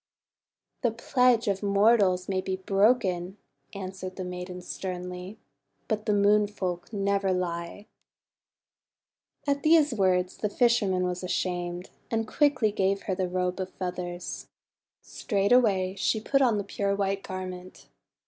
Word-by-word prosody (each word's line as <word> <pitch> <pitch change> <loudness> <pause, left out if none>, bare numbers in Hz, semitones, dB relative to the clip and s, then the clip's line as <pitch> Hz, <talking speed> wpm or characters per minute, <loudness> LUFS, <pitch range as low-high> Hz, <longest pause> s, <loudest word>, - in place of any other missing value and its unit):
'The 240 - +3
pledge 245 0 +2
of 195 -1 0
mortals 200 -2 +3
may 190 -1 0
be 190 0 -2
broken," 190 -1 +1 0.4
answered 185 -1 -6
the 185 - -5
maiden 180 0 -6
sternly, 180 +1 -6 0.5
"but 215 -2 -2
the - - +3
Moon 205 +1 +4
Folk 185 -3 -4
never 200 -2 0
lie." 175 +2 -3 1.6
At 280 -1 0
these 310 -3 +4
words 185 -3 +1
the 210 - -1
fisherman 205 -6 +2
was 180 0 -2
ashamed, 180 0 -3 0.2
and 225 -1 -1
quickly 260 -4 +2
gave 195 -1 0
her 190 - -2
the 185 -1 -1
Robe 180 0 -1
of 185 0 -3
Feathers. 180 -1 -5 0.6
Straightway 200 -3 +2
she 200 +3 0
put 275 +5 +1
on 240 -5 +3
the 205 - -1
pure 200 0 -1
white 195 0 -1
garment. 185 -1 -7
195 Hz, 130 wpm, -27 LUFS, 180-210 Hz, 1.6 s, Moon